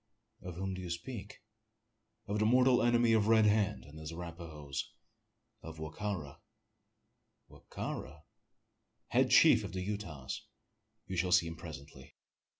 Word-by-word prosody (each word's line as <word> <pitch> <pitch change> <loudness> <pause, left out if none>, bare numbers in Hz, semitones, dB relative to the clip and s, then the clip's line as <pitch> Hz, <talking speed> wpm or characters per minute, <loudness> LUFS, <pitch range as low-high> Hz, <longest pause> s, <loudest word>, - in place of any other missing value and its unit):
"Of 90 -2 -7
whom 95 +1 -3
do 95 - -5
you 90 - -6
speak?" 105 +4 -6 0.8
"Of 105 0 -2
the 110 - +3
mortal 125 +1 +5
enemy 120 -1 +4
of 110 -2 +3
Red 110 -1 +6
Hand 105 0 +2
and 75 +2 -12
his 80 0 -6
Arapahoes 80 -5 -6 0.7
of 80 0 -9
Wa 80 -1 -6
ka 105 +4 -2
ra." 75 -6 -9 1.1
"Wa - - -16
ka - - -4
ra?" 75 +4 -8 0.9
"Head - - +3
chief - - +7
of - - -6
the 95 - -3
Utahs 90 -10 -5 0.6
you 95 - -5
shall 90 +1 +1
see 90 -1 +5
him 85 0 -5
presently. 75 -5 -11
90 Hz, 150 wpm, -33 LUFS, 80-105 Hz, 1.1 s, chief